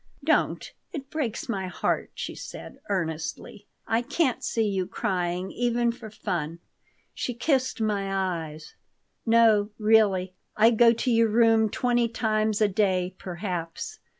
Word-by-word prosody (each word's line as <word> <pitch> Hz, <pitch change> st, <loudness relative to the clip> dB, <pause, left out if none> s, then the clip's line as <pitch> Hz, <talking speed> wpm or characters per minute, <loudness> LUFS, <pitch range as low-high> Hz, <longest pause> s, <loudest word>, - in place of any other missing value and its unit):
"Don't. -, -, +1 dB, 0.2 s
It 275 Hz, -5 st, -7 dB
breaks 270 Hz, -8 st, -3 dB
my 195 Hz, -5 st, -2 dB
heart," 180 Hz, -, -1 dB
she -, -, -5 dB
said, -, -, -9 dB
earnestly. 170 Hz, +2 st, -3 dB, 0.2 s
"I 225 Hz, +1 st, +2 dB
can't 270 Hz, +1 st, 0 dB
see 225 Hz, -2 st, 0 dB
you 190 Hz, -3 st, -1 dB
crying 185 Hz, -3 st, -2 dB
even 240 Hz, 0 st, +1 dB
for 230 Hz, -2 st, -10 dB
fun." 175 Hz, -7 st, -3 dB, 0.6 s
She 245 Hz, -, -3 dB
kissed 260 Hz, 0 st, 0 dB
my 205 Hz, -3 st, -1 dB, 0.4 s
eyes. 155 Hz, 0 st, -11 dB, 0.5 s
"No, 225 Hz, -3 st, +5 dB
really, 210 Hz, -4 st, +3 dB, 0.2 s
I 225 Hz, +2 st, +6 dB
go 235 Hz, 0 st, +6 dB
to 235 Hz, +2 st, 0 dB
your 230 Hz, -1 st, +4 dB
room 225 Hz, 0 st, +4 dB
twenty 240 Hz, +1 st, +1 dB
times 215 Hz, -1 st, 0 dB
a 215 Hz, -, +5 dB
day, 185 Hz, -2 st, +1 dB
perhaps. 180 Hz, -, -5 dB
215 Hz, 135 wpm, -26 LUFS, 190-235 Hz, 0.6 s, I